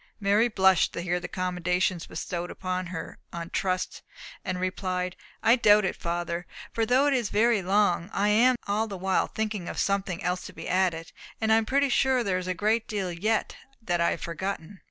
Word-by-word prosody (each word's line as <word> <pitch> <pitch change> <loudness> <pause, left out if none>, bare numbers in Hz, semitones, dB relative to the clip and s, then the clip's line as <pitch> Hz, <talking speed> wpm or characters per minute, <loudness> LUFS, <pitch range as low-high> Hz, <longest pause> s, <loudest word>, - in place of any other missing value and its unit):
Mary 205 +3 +3
blushed 190 -5 +3
to - - -3
hear 180 0 -1
the 175 - -6
commendation 180 0 0
bestowed 175 -1 -4
upon 185 -1 -3
her 170 -2 -7
on 170 0 -6
trust, 185 -1 -1 0.4
and 185 -2 -3
replied, 185 -1 -2 0.3
"I 230 - +6
doubt 210 -4 +5
it, 190 - -1
father. 170 0 -3 0.3
For 225 -1 0
though 255 +4 +4
it 290 - +3
is 240 -6 0
very 220 0 +3
long, 190 -1 +2
I 205 +1 +1
am 240 +5 +5
all 210 +2 0
the 200 -3 -6
while 190 +1 +1
thinking 215 -5 -3
of - - -6
something 195 -3 -1
else 180 +1 -1
to - - -11
be - - -8
added, 180 -3 0 0.3
and 220 0 +3
I - - +6
am 225 -1 0
pretty 280 +2 +2
sure 260 0 +3
there 185 -4 0
is 185 - -6
a 185 - -1
great 215 +5 +1
deal 195 -4 -2
yet 215 +6 -1 0.2
that 175 -7 -1
I 170 - +4
have - - -3
forgotten." 190 +1 -5
190 Hz, 200 wpm, -27 LUFS, 180-215 Hz, 0.4 s, I